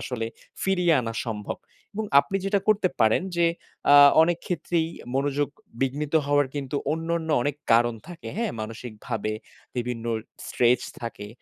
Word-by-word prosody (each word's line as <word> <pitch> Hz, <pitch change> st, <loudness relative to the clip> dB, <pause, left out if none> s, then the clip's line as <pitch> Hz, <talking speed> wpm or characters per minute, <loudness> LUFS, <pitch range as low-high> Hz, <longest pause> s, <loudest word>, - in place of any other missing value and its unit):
আসলে 115 Hz, -3 st, -3 dB, 0.4 s
ফিরিয়ে 180 Hz, -3 st, +3 dB
আনা 115 Hz, -2 st, -4 dB
সম্ভব 105 Hz, -3 st, -4 dB, 0.4 s
এবং 220 Hz, +2 st, -2 dB, 0.2 s
আপনি 195 Hz, -, -3 dB
যেটা 195 Hz, 0 st, +2 dB
করতে 210 Hz, -3 st, +4 dB
পারেন 110 Hz, +8 st, +4 dB
যে 170 Hz, -, +4 dB, 0.5 s
আ -, -, +9 dB, 0.3 s
অনেক 170 Hz, +1 st, +2 dB
ক্ষেত্রেই 170 Hz, -2 st, 0 dB, 0.3 s
মনোযোগ 140 Hz, +1 st, +1 dB, 0.3 s
বিঘ্নিত 145 Hz, +3 st, -1 dB
হওয়ার 145 Hz, 0 st, +3 dB
কিন্তু 140 Hz, 0 st, -3 dB, 0.2 s
অন্যান্য 165 Hz, 0 st, -2 dB
অনেক 145 Hz, +2 st, -1 dB, 0.2 s
কারণ 120 Hz, +1 st, +4 dB
থাকে। 175 Hz, -1 st, -8 dB
হ্যাঁ? 230 Hz, -3 st, -1 dB
মানসিকভাবে 110 Hz, -1 st, -5 dB, 0.4 s
বিভিন্ন 120 Hz, -1 st, -3 dB, 0.4 s
স্ট্রেস 125 Hz, +1 st, +3 dB, 0.2 s
থাকে। 110 Hz, -3 st, -6 dB
145 Hz, 135 wpm, -25 LUFS, 115-170 Hz, 0.5 s, আ